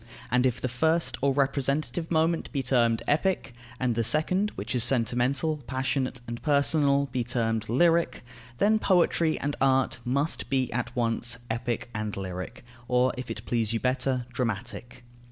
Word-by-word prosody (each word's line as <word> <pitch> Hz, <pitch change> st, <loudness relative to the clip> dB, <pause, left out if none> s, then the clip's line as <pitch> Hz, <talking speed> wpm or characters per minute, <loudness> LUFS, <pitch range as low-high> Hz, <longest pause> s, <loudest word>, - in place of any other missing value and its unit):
And 125 Hz, +1 st, +4 dB
if 125 Hz, -1 st, -2 dB
the -, -, -2 dB
first 160 Hz, +7 st, +1 dB
or 140 Hz, +1 st, +3 dB
representative 140 Hz, +4 st, 0 dB
moment 165 Hz, 0 st, +1 dB
be 140 Hz, -3 st, -2 dB
termed 120 Hz, -3 st, +2 dB
epic, 160 Hz, -3 st, 0 dB, 0.3 s
and 125 Hz, -2 st, +1 dB
the 115 Hz, +1 st, 0 dB
second, 155 Hz, -, +1 dB
which 105 Hz, +4 st, -4 dB
is 125 Hz, -3 st, +3 dB
sentimental, 130 Hz, +5 st, +1 dB
passionate, 130 Hz, -1 st, -2 dB
and 120 Hz, +1 st, -6 dB
personal, 140 Hz, -1 st, +3 dB
be 125 Hz, -1 st, -1 dB
termed 115 Hz, -2 st, -1 dB
lyric, 165 Hz, +6 st, +2 dB, 0.3 s
then 215 Hz, -, +3 dB
poetry 170 Hz, -5 st, +2 dB
and 145 Hz, +1 st, -2 dB
art 135 Hz, -2 st, +2 dB
must 140 Hz, +6 st, -1 dB
be 130 Hz, -2 st, 0 dB
at 120 Hz, 0 st, -3 dB
once 120 Hz, 0 st, +1 dB
epic 120 Hz, +1 st, -3 dB
and 105 Hz, -2 st, -3 dB
lyric, 95 Hz, +3 st, -6 dB, 0.2 s
or, 125 Hz, +1 st, +2 dB
if 125 Hz, -1 st, -7 dB
it 110 Hz, 0 st, -6 dB
please 115 Hz, -2 st, 0 dB
you 115 Hz, -, 0 dB
better, 130 Hz, 0 st, 0 dB
dramatic. 120 Hz, +1 st, -4 dB
130 Hz, 155 wpm, -27 LUFS, 120-145 Hz, 0.3 s, And